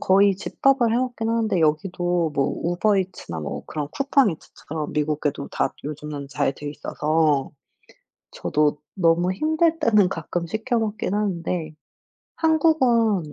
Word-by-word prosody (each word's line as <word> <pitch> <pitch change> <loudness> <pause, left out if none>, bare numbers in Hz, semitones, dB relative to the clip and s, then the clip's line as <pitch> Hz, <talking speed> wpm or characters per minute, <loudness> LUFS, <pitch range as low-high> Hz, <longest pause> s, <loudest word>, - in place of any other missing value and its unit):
거의 195 +1 +4
집밥을 245 +4 +1
해 - - +2
먹긴 245 -3 -1
하는데 225 -6 +1
여기도 175 +1 +1
뭐 140 -1 +2 0.2
우버 175 +5 +2
이츠나 180 - -4
뭐 75 - -5
그런 150 -2 -4
쿠팡 275 - +2
이츠처럼 155 -1 -7
미국에도 150 -1 -1
다 - - -1
요즘은 150 -1 -6
잘돼 140 +2 -2
있어서 150 -1 0 0.8
저도 150 -1 0 0.2
너무 175 0 +2
힘들 315 - +1
때는 210 -4 +4
가끔 170 +1 -4
시켜 225 +6 -1
먹긴 215 -3 -2
하는데 175 -5 -2 0.6
한국은 255 - +2
180 Hz, 280 characters per minute, -23 LUFS, 150-225 Hz, 0.8 s, 거의